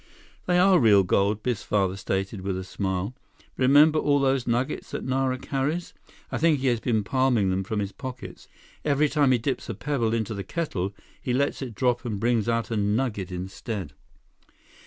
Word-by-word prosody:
"They 180 -1 +3
are 185 0 +5
real 105 -5 +6
gold," 100 +3 +1
Biff's 125 -4 -1
father 95 -3 0
stated, 95 +1 -3
with 95 -1 -2
a 95 - -4
smile. 95 +3 -3 0.4
"Remember 145 +4 +5
all 145 -1 +2
those 135 -2 +1
nuggets 120 +2 -1
that - - -5
Nara 130 0 0
carries? 145 +7 -2 0.4
I - - -2
think 160 -1 +4
he 135 -1 +1
has 120 -2 +1
been 110 -3 0
palming 125 -6 +2
them 95 +1 0
from 110 +3 -4
his 100 -1 -2
pockets. 125 -8 -8 0.4
Every 150 0 +2
time 145 -3 +3
he 125 - +4
dips 130 +3 -3
a - - -3
pebble 120 -6 -1
into 110 -1 -2
the 100 -2 -4
kettle, 100 - -3 0.3
he 125 - -2
lets 140 +3 0
it 125 -5 -6
drop 125 0 +1
and 110 -5 -3
brings 115 0 +1
out 115 0 -1
a 115 - 0
nugget 105 -2 -1
instead." 95 -1 -5
120 Hz, 185 wpm, -26 LUFS, 100-135 Hz, 0.4 s, real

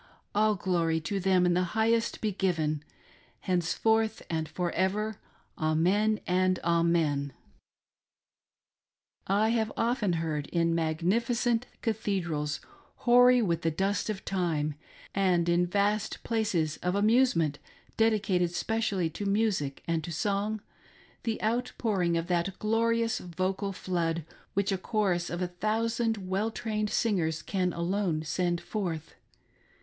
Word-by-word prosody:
All 215 +1 +3
glory 170 -4 +1
to 195 +5 -2
them 185 -1 +3
in 175 - +3
the 180 - +2 0.2
highest 225 +1 +2
be 215 - 0
given, 160 -6 0 0.6
Henceforth 220 +5 +1
and 160 -2 -1
for 175 +2 -2
ever: 205 +3 -1 0.4
Amen, 185 +8 +2
and 185 0 +2
Amen! 165 -5 +1 1.9
I 205 +3 +3
have 225 -2 +1
often 230 -5 +1
heard 155 -3 -2
in 165 -1 +1
magnificent 225 +9 +1 0.2
cathedrals, 170 - -1 0.4
hoary 245 0 +6
with 170 -4 0
the 165 - +1
dust 195 +7 -1
of 200 -3 -4
time, 165 -6 0 0.4
and 180 -3 +2
in 175 +1 +3
vast 205 +3 0
places 195 -9 0
of 180 +1 -1
amusement 205 - +3 0.4
dedicated 210 -5 +2
specially 215 -6 0
to 200 +5 -4
music 195 -9 0
and 165 -1 0
to 170 - -5
song, 205 +5 -1 0.6
the 225 -2 -2
outpouring 215 -6 0
of 165 - -1
that 175 +1 -1
glorious 230 +1 +1
vocal 185 +3 -2
flood, 170 -4 -2 0.3
which 200 +1 +1
a 190 - 0
chorus 185 -4 0
of 175 +1 -2
a - - 0
thousand 220 +2 -1
well 195 +4 0
trained 215 -2 -2
singers, 165 -10 0
can 185 -2 0
alone 170 -1 -1
send 175 +1 0
forth. 170 -4 -4
190 Hz, 125 wpm, -29 LUFS, 170-215 Hz, 1.9 s, hoary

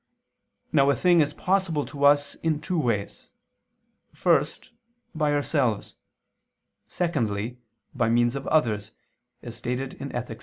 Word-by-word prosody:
Now 140 0 +4
a 140 - +3
thing 175 -2 +4
is 145 -2 +3
possible 180 -6 0
to 140 -1 -2
us 145 0 +4
in 160 -2 0
two 175 +2 -2
ways: 115 -8 -2 0.9
first, - - +1 0.4
by 150 -2 +1
ourselves; 140 -7 0 0.9
secondly, 120 - -2 0.3
by 120 -5 +1
means 120 +2 +2
of 140 - -5
others, 110 -8 +1 0.5
as 120 -2 -7
stated 125 +3 -4
in 140 - -4
_Ethic. 120 -3 -5
140 Hz, 125 wpm, -25 LUFS, 120-150 Hz, 0.9 s, Now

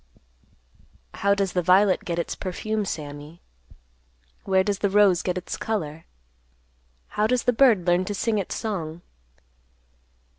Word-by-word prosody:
"How 200 0 +1
does 195 -2 -1
the 180 - +1
violet 185 +3 +4
get 170 -1 -3
its 170 - -2
perfume, 210 +3 -3
Sammy? 150 -1 -7 1.1
Where 190 -1 +3
does 200 0 -1
the 200 - +1
rose 195 -3 +4
get 180 0 -2
its 185 - -5
color? 165 -8 -4 1.0
How 210 +1 0
does 250 +1 +1
the 245 - +2
bird 225 -8 +4
learn 175 +1 +3
to 205 - -4
sing 215 +1 0
its 195 - -4
song?" 175 -7 -4
190 Hz, 140 wpm, -24 LUFS, 175-210 Hz, 1.1 s, violet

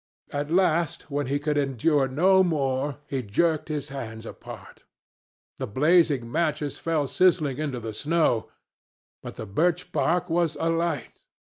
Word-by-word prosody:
At 145 +1 -2
last, 170 -3 +1
when 145 -1 -1
he 140 +2 0
could 145 0 0
endure 135 +1 +1
no 185 +8 +4
more, 140 -4 -1
he 135 -2 -3
jerked 155 +9 0
his 150 -1 -3
hands 115 -5 -7
apart. - - -11 0.8
The - - -3
blazing 145 - +2
matches 155 -2 -1
fell 160 -3 0
sizzling 155 -3 +2
into 145 -5 -2
the 110 -1 -6
snow, 145 -3 +1 0.7
but - - -8
the - - -6
birch 165 - 0
bark 180 +1 +1
was 170 -2 0
alight. 165 -3 -1
150 Hz, 140 wpm, -26 LUFS, 135-165 Hz, 0.8 s, no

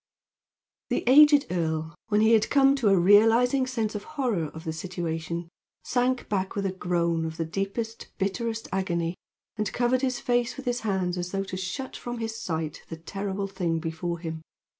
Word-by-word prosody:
The - - 0
aged 290 +3 +7
earl, 160 -2 -1
when 210 0 +2
he 220 +1 +5
had 220 -1 +4
come 275 -1 +5
to 240 -6 +1
a 195 - +5
realizing 225 +8 +5
sense 225 -4 -1
of 210 - -4
the - - -17
horror 250 - -1
of 160 +2 -9
the 160 -2 -3
situation, 170 -1 -4 0.4
sank 250 0 0
back 190 -2 -1
with 200 -1 -1
a 190 - 0
groan 170 -3 0
of 160 0 -4
the 165 - -1
deepest, 200 +6 -4
bitterest 225 +3 -2
agony, 170 -3 0 0.4
and 215 -1 -1
covered 245 +1 +1
his 255 -2 0
face 245 +1 0
with 270 - -8
his 245 0 0
hands 185 -4 -1
as 175 0 -3
though 195 +1 -1
to 190 - -6
shut 185 +9 -4
from 240 0 -5
his 225 -1 -4
sight 160 -3 -3
the 165 - -6
terrible 195 +3 -4
thing 185 -4 -1
before 165 +1 -3
him. 160 -1 -6
195 Hz, 185 wpm, -27 LUFS, 170-235 Hz, 0.4 s, aged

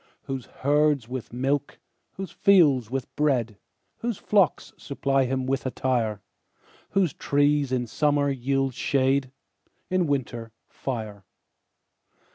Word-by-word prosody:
Whose 135 -3 -5
herds 145 -2 +1
with 125 -1 -6
milk, 135 +4 -1 0.4
whose 190 -3 -6
fields 145 - +4
with 130 +1 -4
bread, 120 -8 0 0.4
Whose 235 -4 -3
flocks 200 -6 +1
supply 135 -1 0
him 130 0 -1
with 135 +1 -1
attire; 120 -5 -1 0.7
Whose 190 -6 +1
trees 145 -1 +1
in 125 -1 0
summer 145 +3 +1
yield 135 0 0
shade, 135 +1 +1 0.6
In 185 -2 +2
winter, 120 -5 -3
fire. 110 -6 -5
135 Hz, 110 wpm, -26 LUFS, 125-145 Hz, 0.7 s, fields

